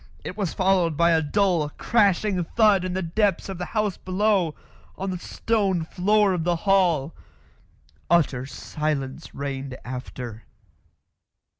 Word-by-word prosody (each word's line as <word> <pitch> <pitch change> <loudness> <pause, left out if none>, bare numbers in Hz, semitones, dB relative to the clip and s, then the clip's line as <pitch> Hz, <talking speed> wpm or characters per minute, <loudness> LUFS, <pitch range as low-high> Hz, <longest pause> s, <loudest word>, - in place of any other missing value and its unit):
It - - -6
was 200 -5 -2
followed 185 -5 +2
by 170 +1 +4
a 160 -1 +4
dull, 170 -1 +1
crashing 200 -3 +2
thud 205 0 +3
in 185 -1 -3
the 190 - -1
depths 195 +3 0
of 190 -2 -5
the 180 - -2
house 210 -3 0
below 185 -3 +1 0.4
on 195 0 -3
the 180 - -4
stone 195 -4 0
floor 205 +3 +2
of 175 -3 -1
the 175 +1 +1
hall. 175 -7 +3 1.0
Utter 140 -7 +2
silence 145 -3 -4
reigned 135 -2 -4
after. 125 -2 -7
180 Hz, 135 wpm, -24 LUFS, 150-195 Hz, 1.0 s, by